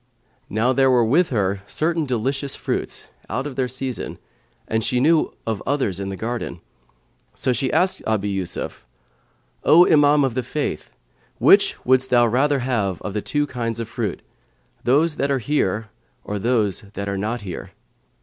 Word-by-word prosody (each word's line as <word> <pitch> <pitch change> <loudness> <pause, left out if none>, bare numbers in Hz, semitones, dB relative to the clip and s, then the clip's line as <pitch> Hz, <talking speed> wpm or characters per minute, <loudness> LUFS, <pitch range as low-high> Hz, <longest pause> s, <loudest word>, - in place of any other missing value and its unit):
Now 115 +4 +1
there 135 0 +4
were 125 -2 +4
with 160 +10 +3
her 100 -4 0
certain 160 +3 0
delicious 135 +3 -1
fruits, - - -3 0.2
out 130 - -2
of 145 -3 -5
their 130 -1 0
season, 130 0 -4 0.5
and 110 0 0
she 125 - +1
knew 155 +4 +3
of 110 -3 -2
others 130 -10 0
in 100 0 -3
the 95 - -4
garden; 115 -3 -4 0.8
so 130 - +1
she 130 +2 -1
asked 185 +1 +1
Abu 105 -2 0
Yusuf, 95 -3 -4 0.8
"O 175 +3 +7
Imam 145 -1 +5
of 135 -3 0
the 130 - -1
Faith, 145 +4 -3 0.5
which - - +5
wouldst 130 +1 +3
thou 120 -1 +5
rather 135 +4 +2
have 105 -8 -1
of 100 - -4
the 105 - -1
two 145 +6 0
kinds 115 -4 -3
of 115 - -3
fruits, - - -4 0.6
those 150 +5 +3
that 140 - 0
are 140 - +2
here 110 -5 -1 0.3
or 105 0 -4
those 110 -4 +1
that 100 -1 -4
are 100 - -2
not 110 +4 -2
here?" 90 -4 -7
125 Hz, 170 wpm, -22 LUFS, 105-140 Hz, 0.8 s, O